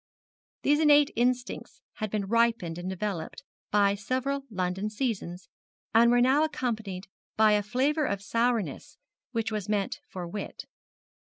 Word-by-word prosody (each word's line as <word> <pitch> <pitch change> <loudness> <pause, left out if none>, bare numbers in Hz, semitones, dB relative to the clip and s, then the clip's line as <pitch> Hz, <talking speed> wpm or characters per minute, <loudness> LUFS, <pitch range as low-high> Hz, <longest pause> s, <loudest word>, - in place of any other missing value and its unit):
These 295 +1 +4
innate 295 -2 +5
instincts 245 +1 -1 0.2
had 215 - -2
been 205 -1 -1
ripened 225 -6 +1
and 180 +1 -4
developed 190 -3 -4 0.3
by 200 -1 +4
several 260 +7 -2
London 190 0 -2
seasons, 205 -7 -3 0.5
and 230 +1 +6
were 245 0 +4
now 265 +5 +4
accompanied 220 -10 -3 0.3
by 215 0 +6
a 210 0 +4
flavour 270 +8 +1
of 200 -5 -1
sourness 230 0 -1 0.3
which 225 -2 -1
was 210 -2 -3
meant 205 +6 -1
for 180 -7 -6
wit. 200 +4 -6
215 Hz, 135 wpm, -28 LUFS, 195-250 Hz, 0.5 s, and